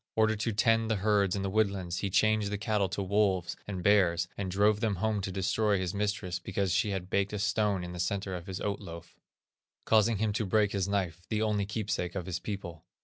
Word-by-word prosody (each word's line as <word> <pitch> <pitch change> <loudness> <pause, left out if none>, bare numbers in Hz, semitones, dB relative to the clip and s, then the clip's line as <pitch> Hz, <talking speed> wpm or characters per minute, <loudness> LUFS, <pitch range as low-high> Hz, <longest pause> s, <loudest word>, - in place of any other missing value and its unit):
Ordered 110 -1 +2
to 115 +1 0
tend 115 +1 +2
the 110 - +2
herds 100 -2 +2
in 100 - -2
the 95 - -1
woodlands, 100 -5 0
he 100 - -2
changed 110 +1 +2
the 105 - -1
cattle 105 -2 0
to 100 +2 -3
wolves 95 -2 +1
and 95 -3 -4
bears, 90 -4 +3
and 100 -2 -3
drove 105 +3 +3
them 110 -3 0
home 105 +2 0
to 95 - -4
destroy 100 +2 +1
his 90 -2 -2
mistress 100 -3 -2
because 95 0 -1
she 105 - +2
had 95 -2 -4
baked 100 +1 +1
a - - -1
stone 105 -2 +1
in 90 - -6
the 90 - -7
centre 95 +2 -2
of 90 -2 -6
his 95 0 -5
oat 100 -1 -2
loaf, 85 -4 -10 0.7
causing 110 0 +4
him 105 0 0
to 110 +1 -1
break 105 +1 +2
his 100 -2 -1
knife, 90 -4 -2
the 110 -1 0
only 105 -2 0
keepsake 100 -4 -2
of 90 -3 -3
his 90 -2 -3
people. 85 -7 -6
100 Hz, 225 wpm, -30 LUFS, 95-105 Hz, 0.7 s, causing